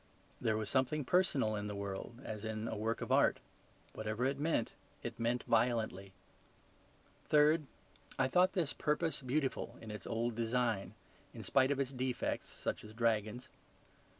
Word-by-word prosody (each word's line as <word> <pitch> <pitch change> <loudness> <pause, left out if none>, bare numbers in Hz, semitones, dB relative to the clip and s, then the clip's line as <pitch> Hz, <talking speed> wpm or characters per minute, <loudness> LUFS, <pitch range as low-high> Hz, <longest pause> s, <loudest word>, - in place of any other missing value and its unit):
There 110 -1 +2
was 110 -1 -2
something 130 +4 +1
personal 140 -11 +2
in 105 0 -3
the 105 - -4
world, 100 +4 -5
as 105 -1 -5
in 110 0 -3
a - - -3
work 110 +2 -1
of - - -3
art; - - +5 0.6
whatever 110 +3 -2
it 135 +1 0
meant 150 -6 +1 0.3
it - - -5
meant 120 +2 +1
violently. 110 -4 +1 1.2
Third, 150 0 +5 0.5
I 130 - +3
thought 180 +7 +4
this 170 -6 0
purpose 150 -1 0
beautiful 135 +1 -1
in 110 - -8
its 105 - -7
old 115 +1 0
design, 115 -2 0 0.4
in - - -7
spite 135 -1 +4
of 140 -1 +1
its 135 -1 0
defects, 130 -1 -2
such - - -4
as 110 0 -11
dragons. 115 +1 0
120 Hz, 155 wpm, -35 LUFS, 110-140 Hz, 1.2 s, art